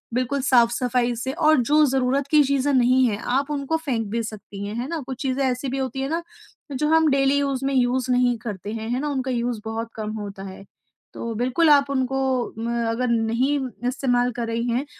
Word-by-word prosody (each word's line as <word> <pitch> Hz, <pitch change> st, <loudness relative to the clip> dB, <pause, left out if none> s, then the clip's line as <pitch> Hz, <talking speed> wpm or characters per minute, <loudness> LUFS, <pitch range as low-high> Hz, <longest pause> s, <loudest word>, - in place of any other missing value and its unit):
बिल्कुल 255 Hz, +3 st, 0 dB
साफ़ 240 Hz, -3 st, +4 dB
सफ़ाई 245 Hz, 0 st, 0 dB
से 240 Hz, +3 st, -3 dB
और 310 Hz, -1 st, +4 dB
जो 300 Hz, +5 st, +4 dB
ज़रूरत 265 Hz, +1 st, +1 dB
की 305 Hz, -1 st, +6 dB
चीज़ें 280 Hz, 0 st, +1 dB
नहीं 255 Hz, +1 st, +4 dB
हैं 210 Hz, -3 st, -1 dB, 0.2 s
आप 280 Hz, +2 st, -4 dB
उनको 290 Hz, +2 st, -1 dB
फेंक 255 Hz, -9 st, -2 dB
भी 230 Hz, 0 st, -1 dB
सकती 205 Hz, -2 st, -7 dB
हैं, 205 Hz, +2 st, -5 dB
है 245 Hz, +3 st, -3 dB
ना? 330 Hz, -1 st, -2 dB
कुछ 260 Hz, -1 st, -6 dB
चीज़ें 270 Hz, +1 st, 0 dB
ऐसी 255 Hz, +1 st, -1 dB
भी 265 Hz, -, -3 dB
होती 265 Hz, 0 st, -3 dB
है 270 Hz, -, -2 dB
ना 330 Hz, +2 st, -2 dB, 0.5 s
जो 300 Hz, +3 st, 0 dB
हम 320 Hz, 0 st, +4 dB
डेली 275 Hz, +1 st, +3 dB
यूज़ 275 Hz, -2 st, -1 dB
में 275 Hz, -, 0 dB
यूज़ 255 Hz, 0 st, +1 dB
नहीं 245 Hz, -1 st, +2 dB
करते 210 Hz, -2 st, -6 dB
हैं, 225 Hz, 0 st, -5 dB
है 245 Hz, +2 st, 0 dB
ना? 295 Hz, -, -2 dB
उनका 265 Hz, -2 st, -2 dB, 0.2 s
उसे 225 Hz, -3 st, -4 dB
बहुत 225 Hz, +1 st, -4 dB
कम 215 Hz, -1 st, -4 dB
होता 200 Hz, -2 st, -7 dB
है। 195 Hz, 0 st, -9 dB, 0.5 s
तो 230 Hz, -, -5 dB
बिल्कुल 255 Hz, +8 st, +2 dB
आप 280 Hz, -1 st, +5 dB
उनको 265 Hz, -1 st, -1 dB, 0.4 s
म 225 Hz, -, -3 dB, 0.2 s
अगर 245 Hz, +2 st, -1 dB
नहीं 235 Hz, +5 st, +1 dB, 0.3 s
इस्तेमाल 250 Hz, -1 st, +1 dB
कर 235 Hz, -1 st, -3 dB
रही 230 Hz, +1 st, -2 dB
हैं 250 Hz, +5 st, 0 dB
255 Hz, 215 wpm, -23 LUFS, 235-275 Hz, 0.5 s, की